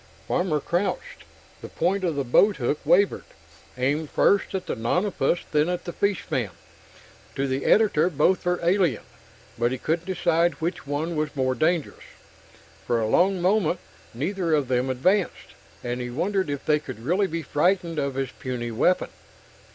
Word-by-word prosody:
Farmer 175 Hz, -4 st, +1 dB
crouched. 175 Hz, +7 st, -3 dB, 0.4 s
The -, -, -8 dB
point 190 Hz, +3 st, 0 dB
of 170 Hz, -4 st, 0 dB
the 140 Hz, -, 0 dB
boathook 145 Hz, -, +2 dB
wavered, 175 Hz, +6 st, +3 dB, 0.5 s
aimed 145 Hz, +4 st, 0 dB
first 200 Hz, 0 st, +2 dB
at 185 Hz, -, -3 dB
the -, -, -3 dB
nonapus, 170 Hz, -, 0 dB
then 150 Hz, +2 st, +2 dB
at 180 Hz, -1 st, -3 dB
the 175 Hz, -, -5 dB
fishman. 165 Hz, -, -1 dB, 0.9 s
To 135 Hz, -, 0 dB
the 130 Hz, +1 st, -2 dB
editor, 200 Hz, -6 st, +4 dB
both 170 Hz, +4 st, +2 dB
were 180 Hz, 0 st, 0 dB
alien 175 Hz, -, +2 dB, 0.6 s
but 120 Hz, +1 st, +2 dB
he 130 Hz, -, -2 dB
couldn't 165 Hz, +7 st, -2 dB
decide 175 Hz, -2 st, +1 dB
which 165 Hz, -2 st, -4 dB
one 155 Hz, +4 st, -2 dB
was 155 Hz, 0 st, -2 dB
more 130 Hz, -1 st, +1 dB
dangerous. 155 Hz, +4 st, -1 dB, 0.8 s
For 120 Hz, -, +2 dB
a 110 Hz, -, 0 dB
long 185 Hz, -, +2 dB
moment, 185 Hz, -3 st, +2 dB, 0.3 s
neither 165 Hz, -, -1 dB
of 140 Hz, -4 st, -1 dB
them 125 Hz, +1 st, +1 dB
advanced, 180 Hz, +10 st, 0 dB, 0.3 s
and 120 Hz, 0 st, -3 dB
he 125 Hz, -, -4 dB
wondered 185 Hz, +7 st, -1 dB
if 145 Hz, -1 st, -4 dB
they 150 Hz, -1 st, +3 dB
could 130 Hz, -6 st, -9 dB
really 190 Hz, +6 st, +2 dB
be 165 Hz, -2 st, -4 dB
frightened 170 Hz, +2 st, +1 dB
of 140 Hz, -2 st, -2 dB
his 135 Hz, -2 st, -2 dB
puny 120 Hz, -2 st, -5 dB
weapon. 155 Hz, +11 st, +1 dB
160 Hz, 160 wpm, -25 LUFS, 135-180 Hz, 0.9 s, editor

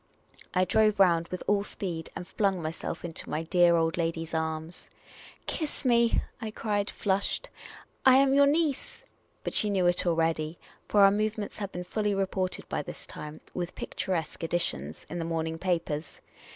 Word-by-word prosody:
I 185 Hz, 0 st, +4 dB
drove 215 Hz, +2 st, +3 dB
round 170 Hz, -3 st, +5 dB
with 180 Hz, -, -5 dB
all 205 Hz, -1 st, +2 dB
speed, 175 Hz, -6 st, -5 dB
and 180 Hz, -, -6 dB
flung 195 Hz, -3 st, +1 dB
myself 165 Hz, +1 st, -4 dB
into 165 Hz, -2 st, -5 dB
my 155 Hz, -, -1 dB
dear 175 Hz, 0 st, +5 dB
old 165 Hz, 0 st, +1 dB
lady's 165 Hz, -1 st, -2 dB
arms. 160 Hz, +1 st, -3 dB, 0.3 s
" -, -, -19 dB
Kiss 305 Hz, -3 st, -4 dB
me," 235 Hz, -2 st, +4 dB, 0.2 s
I 220 Hz, -, -3 dB
cried, 210 Hz, -1 st, -1 dB
flushed. 195 Hz, -1 st, -1 dB, 0.2 s
" -, -, -21 dB
I 260 Hz, 0 st, +8 dB
am 270 Hz, 0 st, +5 dB
your 280 Hz, 0 st, +6 dB
niece! 300 Hz, -2 st, 0 dB, 0.2 s
" -, -, -40 dB
But -, -, -3 dB
she 210 Hz, -, +3 dB
knew 190 Hz, -3 st, +2 dB
it 175 Hz, 0 st, +2 dB
already, 165 Hz, -1 st, +1 dB, 0.3 s
for 205 Hz, -, +4 dB
our 195 Hz, -, +8 dB
movements 215 Hz, +1 st, -2 dB
had 200 Hz, -2 st, -4 dB
been 180 Hz, -, -5 dB
fully 210 Hz, +2 st, -1 dB
re 195 Hz, 0 st, +2 dB
ported 185 Hz, -1 st, -3 dB
by -, -, -1 dB
this -, -, -9 dB
time 150 Hz, +1 st, -8 dB
(with 180 Hz, -1 st, -4 dB
picturesque 185 Hz, -5 st, -3 dB
additions) 160 Hz, -, -2 dB
in 175 Hz, -, -5 dB
the -, -, -1 dB
morning 160 Hz, 0 st, -2 dB
papers. 165 Hz, -4 st, -2 dB
180 Hz, 180 wpm, -29 LUFS, 165-205 Hz, 0.3 s, I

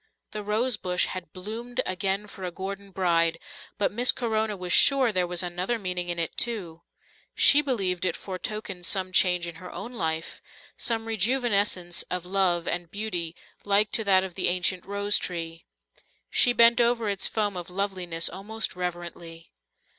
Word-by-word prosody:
The 215 Hz, -, -5 dB
rosebush 210 Hz, -4 st, +1 dB
had 180 Hz, -4 st, -7 dB
bloomed 230 Hz, +6 st, -7 dB
again 195 Hz, +2 st, -1 dB
for 195 Hz, -2 st, -11 dB
a 180 Hz, -, -2 dB
Gordon 195 Hz, +2 st, -7 dB
bride, 170 Hz, -3 st, +1 dB, 0.4 s
but 205 Hz, -, 0 dB
Miss 240 Hz, +4 st, +4 dB
Corona 220 Hz, -3 st, -2 dB
was 180 Hz, -1 st, -3 dB
sure 270 Hz, -4 st, +6 dB
there 180 Hz, -3 st, 0 dB
was 175 Hz, 0 st, 0 dB
another 180 Hz, +6 st, -2 dB
meaning 180 Hz, -3 st, -2 dB
in 175 Hz, -, -2 dB
it 165 Hz, -1 st, -1 dB
too; 185 Hz, -9 st, 0 dB, 0.5 s
she 290 Hz, -, +6 dB
believed 195 Hz, -11 st, -1 dB
it 180 Hz, -3 st, +1 dB
foretokened 190 Hz, -1 st, -6 dB
some 185 Hz, -1 st, 0 dB
change 180 Hz, -1 st, +3 dB
in 170 Hz, -1 st, -8 dB
her 180 Hz, -, -9 dB
own 240 Hz, -, -7 dB
life, 160 Hz, -6 st, -3 dB, 0.3 s
some 225 Hz, -1 st, -1 dB
rejuvenescence 210 Hz, -5 st, +1 dB
of 180 Hz, -1 st, -3 dB
love 180 Hz, -2 st, +1 dB
and 175 Hz, -1 st, -2 dB
beauty 175 Hz, -5 st, -3 dB, 0.3 s
like 205 Hz, +1 st, +3 dB
to 225 Hz, -, 0 dB
that 190 Hz, -1 st, +4 dB
of 190 Hz, -2 st, -6 dB
the -, -, 0 dB
ancient 180 Hz, +1 st, +1 dB
rose 200 Hz, +1 st, +2 dB
tree. 165 Hz, -2 st, -5 dB, 0.7 s
She 245 Hz, -, +4 dB
bent 235 Hz, 0 st, +6 dB
over 235 Hz, -1 st, +1 dB
its 200 Hz, -1 st, +1 dB
foam 205 Hz, -3 st, -1 dB
of 175 Hz, -1 st, -6 dB
loveliness 180 Hz, -3 st, 0 dB
almost 215 Hz, +4 st, -4 dB
reverently. 175 Hz, -2 st, -7 dB
190 Hz, 160 wpm, -26 LUFS, 175-215 Hz, 0.7 s, sure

